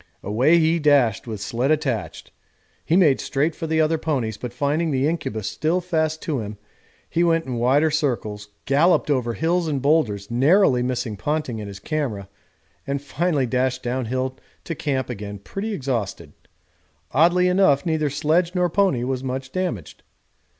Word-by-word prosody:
Away 125 - +3
he 165 +1 +2
dashed 140 -9 +3
with 110 -3 -5
sledge 120 +6 -1
attached; 145 -7 -2 0.5
he 165 - +1
made 160 -8 +4
straight 145 +4 0
for 165 - -5
the 160 0 +1
other 160 0 +2
ponies, 130 -10 -1
but 125 +3 -6
finding 145 +6 0
the 135 -1 +1
incubus 110 - -3
still 165 +4 0
fast 160 -3 -1
to 150 -5 -1
him 105 -1 -6 0.5
he 170 - +1
went 165 -1 +2
in 125 -2 -4
wider 140 +6 +3
circles, 115 -9 -2 0.2
galloped 150 +3 +3
over 120 -4 0
hills 170 +1 0
and 145 -3 -1
boulders, 125 -9 +1
narrowly 135 +2 +4
missing 125 -3 -2
Ponting 145 -4 -2
and 105 - -6
his 100 -1 -8
camera, 110 -5 -3 0.6
and 140 0 -1
finally 145 0 0
dashed 130 +1 -1
down 125 +1 -2
hill 130 +2 -3 0.2
to 165 - -4
camp 140 -4 -2
again 105 -4 -6
pretty 195 - -5
exhausted 115 - -3 0.8
oddly 175 +5 +4
enough 180 -7 +3
neither 160 -3 0
sledge 160 +5 +1
nor 180 -2 +1
pony 185 -11 +2
was 130 0 -2
much 130 +1 -4
damaged. 175 - -4
140 Hz, 165 wpm, -22 LUFS, 120-160 Hz, 0.8 s, made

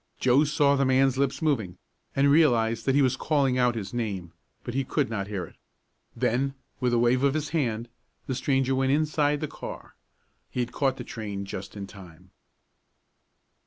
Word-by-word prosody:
Joe 130 +4 +4
saw 145 -1 +3
the 140 - +2
man's 130 0 +3
lips 140 +3 0
moving, 110 - 0 0.4
and 140 +1 +4
realized 115 -7 +3
that 135 - +3
he 145 - +5
was 130 -1 +2
calling 135 -3 +1
out 125 -1 +3
his 100 -2 -5
name, 100 -8 -3 0.3
but 120 - -5
he 135 +1 0
could 135 -1 -1
not 100 -3 -2
hear 100 -4 -3
it. - - -17 0.6
Then, 135 +4 0 0.2
with 125 -1 +1
a 120 - +3
wave 120 +2 +3
of 140 +1 +3
his 155 -2 -2
hand 120 -8 -1 0.4
the 130 - -2
stranger 135 0 +1
went 130 0 +1
inside 150 0 +1
the 155 - -1
car. - - -9 0.6
He - - -5
had 120 -1 -1
caught 135 -2 0
the - - -5
train 100 -3 -5
just 100 +1 -7
in 100 - -5
time. 90 -2 -14
130 Hz, 185 wpm, -27 LUFS, 110-140 Hz, 0.6 s, he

